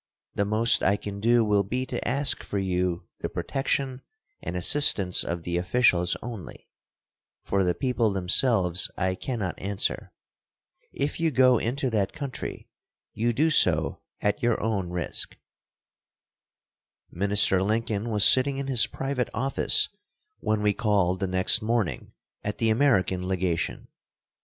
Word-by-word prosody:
The 100 Hz, -, 0 dB
most 115 Hz, +3 st, +2 dB
I 100 Hz, +2 st, +2 dB
can 100 Hz, -1 st, -7 dB
do 115 Hz, +2 st, +3 dB
will 105 Hz, -1 st, +2 dB
be 125 Hz, +7 st, -3 dB
to -, -, -5 dB
ask 140 Hz, +4 st, +1 dB
for 100 Hz, -, -5 dB
you 90 Hz, -2 st, -1 dB, 0.2 s
the -, -, -4 dB
protection 135 Hz, -1 st, -2 dB, 0.4 s
and 90 Hz, -, -4 dB
assistance 95 Hz, -4 st, +4 dB
of 85 Hz, 0 st, -4 dB
the 85 Hz, 0 st, -2 dB
officials 90 Hz, -3 st, +2 dB
only; 115 Hz, -8 st, -9 dB, 0.8 s
for 100 Hz, -1 st, 0 dB
the 90 Hz, -1 st, 0 dB
people 125 Hz, -4 st, 0 dB
themselves 95 Hz, -1 st, +2 dB
I 95 Hz, 0 st, 0 dB
cannot 105 Hz, -2 st, -4 dB
answer. 100 Hz, 0 st, -2 dB, 0.8 s
If 140 Hz, +4 st, -3 dB
you 165 Hz, -1 st, +2 dB
go 130 Hz, -4 st, +4 dB
into 130 Hz, +2 st, -2 dB
that 100 Hz, -3 st, -1 dB
country 140 Hz, -3 st, -6 dB, 0.5 s
you 115 Hz, +3 st, 0 dB
do 155 Hz, +7 st, +1 dB
so 80 Hz, -, +3 dB, 0.2 s
at 105 Hz, +7 st, 0 dB
your 120 Hz, -2 st, +1 dB
own 100 Hz, -5 st, -2 dB
risk." 90 Hz, -1 st, -4 dB, 1.7 s
Minister 100 Hz, 0 st, +2 dB
Lincoln 110 Hz, +1 st, -1 dB
was 105 Hz, -3 st, +1 dB
sitting 135 Hz, +1 st, +4 dB
in 140 Hz, -, -3 dB
his 130 Hz, -4 st, +4 dB
private 135 Hz, -3 st, -3 dB
office 135 Hz, +4 st, +1 dB, 0.5 s
when 110 Hz, -1 st, -1 dB
we 105 Hz, -1 st, +3 dB
called 100 Hz, -5 st, +1 dB
the 95 Hz, -, -1 dB
next 95 Hz, +5 st, +2 dB
morning 110 Hz, -, -2 dB, 0.3 s
at 105 Hz, -, -3 dB
I -, -, -34 dB
the 115 Hz, -, +1 dB
American 95 Hz, -8 st, +1 dB
legation. 90 Hz, -3 st, -2 dB
105 Hz, 140 wpm, -26 LUFS, 95-125 Hz, 1.7 s, assistance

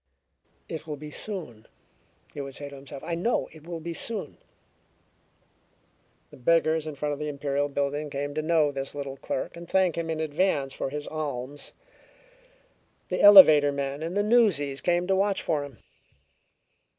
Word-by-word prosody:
"It 160 Hz, 0 st, -7 dB
will 150 Hz, -, -4 dB
be 150 Hz, +1 st, -9 dB
soon," 155 Hz, -, -6 dB, 0.7 s
he 145 Hz, -, -5 dB
would 135 Hz, -1 st, -7 dB
say 145 Hz, -1 st, -7 dB
to 140 Hz, -, -11 dB
himself. 135 Hz, 0 st, -10 dB
"I 170 Hz, -, -4 dB
know 180 Hz, +9 st, 0 dB
it 155 Hz, 0 st, -15 dB
will 170 Hz, -1 st, -5 dB
be 170 Hz, +1 st, -5 dB
soon." 200 Hz, -3 st, -1 dB, 1.9 s
The -, -, -13 dB
beggars 160 Hz, +3 st, +2 dB
in 155 Hz, -, -5 dB
front 145 Hz, +1 st, -2 dB
of 145 Hz, -, -6 dB
the 150 Hz, -, -3 dB
Imperial 145 Hz, 0 st, -1 dB
building 145 Hz, +1 st, -2 dB
came 145 Hz, 0 st, -4 dB
to 155 Hz, -, -1 dB
know 155 Hz, -2 st, +2 dB
the 135 Hz, -1 st, -4 dB, 0.2 s
little 140 Hz, -1 st, -5 dB
clerk 130 Hz, -, -4 dB
and 170 Hz, 0 st, -10 dB
thank 185 Hz, -3 st, +2 dB
him 165 Hz, -1 st, -3 dB
in 160 Hz, -1 st, -2 dB
advance 150 Hz, -3 st, 0 dB
for -, -, -3 dB
his 150 Hz, +1 st, -6 dB
alms. 145 Hz, -2 st, -5 dB, 1.4 s
The -, -, -1 dB
elevator 155 Hz, -8 st, +9 dB
men 140 Hz, +1 st, -4 dB
and 170 Hz, +4 st, -3 dB
the 205 Hz, -, +2 dB
newsies 200 Hz, -, +2 dB
came 175 Hz, 0 st, +1 dB
to 190 Hz, +1 st, +1 dB
watch 195 Hz, +1 st, 0 dB
for 150 Hz, -3 st, 0 dB
him. 140 Hz, -4 st, -10 dB
150 Hz, 170 wpm, -26 LUFS, 140-170 Hz, 1.9 s, elevator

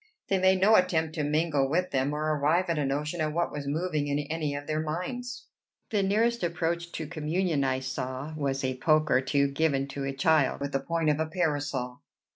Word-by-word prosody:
They 195 Hz, -, +2 dB
made 190 Hz, 0 st, +4 dB
no 205 Hz, +4 st, +5 dB
attempt 160 Hz, -3 st, +1 dB
to 155 Hz, -, -2 dB
mingle 150 Hz, -2 st, +1 dB
with 180 Hz, +5 st, 0 dB
them, 135 Hz, +1 st, +1 dB
or 150 Hz, +1 st, -2 dB
arrive 165 Hz, +5 st, +2 dB
at 160 Hz, -, 0 dB
a 145 Hz, -, +1 dB
notion 150 Hz, +4 st, -2 dB
of 155 Hz, -1 st, 0 dB
what 170 Hz, +1 st, 0 dB
was 145 Hz, -1 st, -5 dB
moving 155 Hz, 0 st, -1 dB
in 145 Hz, 0 st, 0 dB
any 150 Hz, 0 st, -2 dB
of 145 Hz, 0 st, -5 dB
their 155 Hz, +1 st, -1 dB
minds. 235 Hz, +11 st, -4 dB, 0.5 s
The 210 Hz, -2 st, +2 dB
nearest 225 Hz, +5 st, +1 dB
approach 170 Hz, 0 st, -1 dB
to 160 Hz, -, -4 dB
communion 160 Hz, 0 st, -1 dB
I 130 Hz, -1 st, 0 dB
saw 130 Hz, +2 st, -4 dB
was 135 Hz, -2 st, -2 dB
a 130 Hz, 0 st, -1 dB
poke 155 Hz, +2 st, +2 dB
or 130 Hz, -, +4 dB
two 140 Hz, +1 st, +2 dB
given 140 Hz, -1 st, +1 dB
to 140 Hz, 0 st, -5 dB
a 135 Hz, -, -1 dB
child 140 Hz, 0 st, +2 dB
with 140 Hz, 0 st, -3 dB
the 135 Hz, -, 0 dB
point 165 Hz, +2 st, 0 dB
of 150 Hz, -, -1 dB
a 160 Hz, -, 0 dB
parasol. 145 Hz, -7 st, -2 dB
155 Hz, 215 wpm, -28 LUFS, 140-170 Hz, 0.5 s, no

